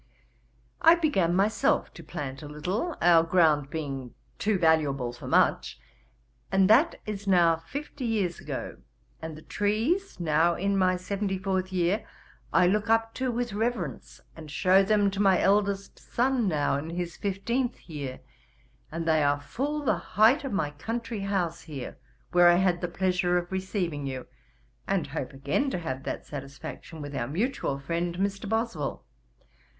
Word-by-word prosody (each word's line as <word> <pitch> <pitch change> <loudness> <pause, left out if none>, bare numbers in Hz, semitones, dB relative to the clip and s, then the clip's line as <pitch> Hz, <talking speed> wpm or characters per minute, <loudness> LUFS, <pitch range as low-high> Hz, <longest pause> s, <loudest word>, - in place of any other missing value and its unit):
I 330 0 +8
began 195 - +1
myself 215 +8 +2
to - - -11
plant 140 -5 -6
a 150 - -8
little, 185 - -3
our 170 -1 +7
ground 160 -4 +3
being 135 -5 -5 0.2
too 210 -1 +1
valuable 145 -7 +2
for 120 - -10
much, 60 0 +2 0.7
and 195 -1 +4
that 295 +10 +5
is 205 -1 -5
now 170 -3 +5
fifty 275 - -6
years 205 -7 0
ago; - - -5 0.4
and 160 -1 -6
the 155 - -13
trees, 230 - -1
now 170 +1 +2
in 200 +3 0
my 185 -1 +3
seventy 195 +1 -2
fourth 190 0 -1
year, 185 +4 +1 0.5
I - - +5
look 210 +4 +1
up 225 0 +2
to 255 -1 -1
with 240 -2 -2
reverence, 210 - -3 0.2
and 155 -2 -10
shew 185 +5 +4
them 205 0 +3
to 195 - -5
my 195 -2 +4
eldest 200 0 +1
son 250 -2 0
now 145 -5 +1
in 150 +3 -5
his 175 0 -4
fifteenth 235 +6 -2
year, 140 -6 -6 0.7
and 165 0 -4
they 160 -1 +4
are 145 0 +2
full 285 - -3
the 215 -7 +2
height 220 - +3
of 270 - -4
my 160 -7 -1
country 230 +8 -4
house 190 -4 -1
here, 140 -6 -8 0.3
where 175 0 +6
I 175 - +7
had 180 -1 +2
the 175 - -1
pleasure 180 0 +1
of 175 0 -3
receiving 185 -6 -2
you, 130 -1 -5 0.6
and - - +1
hope - - -5
again 140 - -1
to 260 - -2
have 135 -6 -4
that - - -4
satisfaction 140 +2 -8
with 145 0 -7
our 120 -3 -2
mutual 180 - -1
friend, 170 +5 -2
Mr. 195 +1 -2
Boswell. 220 - -2
185 Hz, 160 wpm, -27 LUFS, 155-210 Hz, 0.7 s, I